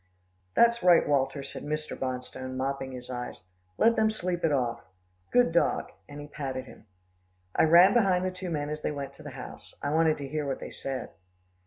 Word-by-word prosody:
"That's 235 0 +5
right, 175 -2 +5
Walter," 140 0 +1
said - - -7
Mr. 155 +1 -3
Bonstone 130 0 -4
mopping 135 0 -2
his 125 0 -8
eyes, 125 0 -5 0.4
"let 230 0 +5
them 220 0 +3
sleep 180 -5 -2
it 165 - +3
off. 120 -4 0 0.5
Good 245 -8 +4
dog," 170 - +1 0.2
and 145 0 -8
he 145 - -7
patted 135 -3 -5
him. 115 - -15 0.7
I - - +5
ran 170 +4 +7
behind 190 -6 +3
the 185 - 0
two 185 0 -6
men 150 -2 -2
as 150 0 -4
they - - -1
went 140 -2 -5
to - - -13
the 145 - -7
house. 130 -2 -10
I 145 - -2
wanted 160 0 +3
to 140 -1 -6
hear 150 +1 -3
what 135 - -2
they - - -7
said. 135 -2 -5
145 Hz, 200 wpm, -28 LUFS, 135-175 Hz, 0.7 s, ran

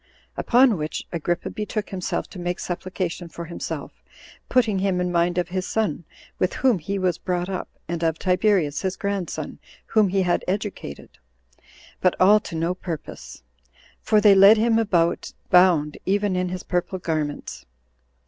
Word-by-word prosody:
Upon 245 -3 +4
which 155 +1 -4
Agrippa 175 +1 -2
betook 215 0 -4
himself 185 -2 -3
to 190 - -9
make 175 0 -3
supplication 175 -1 -4
for 170 +2 -7
himself, 170 - -6 0.5
putting 220 -6 +2
him 190 -1 0
in 180 0 -1
mind 175 0 +1
of 175 -1 0
his 185 0 -3
son, 175 -7 -1 0.3
with 185 - +1
whom 250 -8 +2
he 195 +5 -3
was 185 -3 0
brought 180 0 -2
up, 185 -2 -4 0.2
and 170 0 -3
of 160 -1 +1
Tiberius 180 -5 +1
[his 190 -1 -2
grandson] 200 -3 -4 0.3
whom 215 -2 +3
he 190 0 +1
had 175 -1 +1
educated; 190 - -5 0.8
but 185 - +2
all 205 +3 +6
to 170 - -8
no 165 +2 0
purpose; 170 - -8 0.6
for 215 -1 +3
they 205 -1 +7
led 195 +3 +8
him 225 +1 +3
about 175 -6 +1 0.2
bound 175 -5 +4
even 200 0 +1
in 180 0 0
his 180 0 -5
purple 180 +1 -2
garments. 155 -4 -4
185 Hz, 160 wpm, -23 LUFS, 175-200 Hz, 0.8 s, led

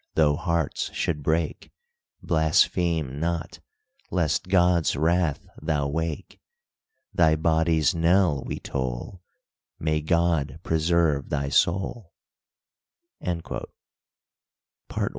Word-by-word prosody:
though 75 -2 +4
hearts 85 -2 -1
should 75 -4 -1
break, 80 +2 -1 0.5
Blaspheme 80 -2 +1
not, 85 0 -3 0.5
lest 85 -2 0
God's 90 -4 +3
wrath 80 0 +1 0.2
thou 75 -3 0
wake! 80 +4 -4 0.7
Thy 80 -3 +4
body's 80 0 +2
knell 85 -3 +3
we - - -5
toll, 65 +7 -4 0.6
May 80 -1 0
God 80 -3 +1
preserve 80 -3 +1
thy 70 -2 -1
soul!" 95 - 0 1.1
PART 85 -2 -4 1.2
I. - - -1
80 Hz, 90 wpm, -25 LUFS, 75-85 Hz, 1.2 s, though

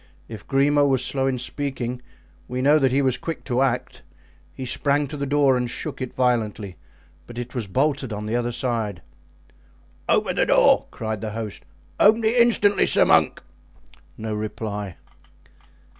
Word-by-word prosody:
If 110 -3 -10
Grimaud 145 +1 +3
was 130 -2 +1
slow 135 -1 0
in 130 -1 0
speaking, 125 -1 -4 0.5
we 125 0 -4
know 145 +4 +4
that 135 -3 +2
he 140 +2 +2
was 130 -2 +1
quick 165 -2 -5
to 125 -1 -1
act; 125 -2 -1 0.5
he 130 - -7
sprang 140 +3 +1
to 145 +2 -7
the 140 -1 -3
door 140 -1 +3
and 125 -1 -1
shook - - -6
it 130 - -4
violently, 110 -6 -1 0.5
but 120 - -11
it 120 0 -6
was 120 -5 -3
bolted 135 +4 0
on 105 0 -5
the 110 +2 -2
other 120 0 -1
side. 115 -7 -2 1.1
"Open - - +1
the - - +2
door!" - - +4
cried 110 -2 -5
the 110 -1 -4
host; 110 -2 -6 0.3
"open 220 +2 +5
it 220 +2 +2
instantly, 230 -4 +4
sir - - +4
monk!" - - +3 0.7
No 110 0 -4
reply. 105 -3 -5
125 Hz, 165 wpm, -23 LUFS, 110-140 Hz, 1.1 s, open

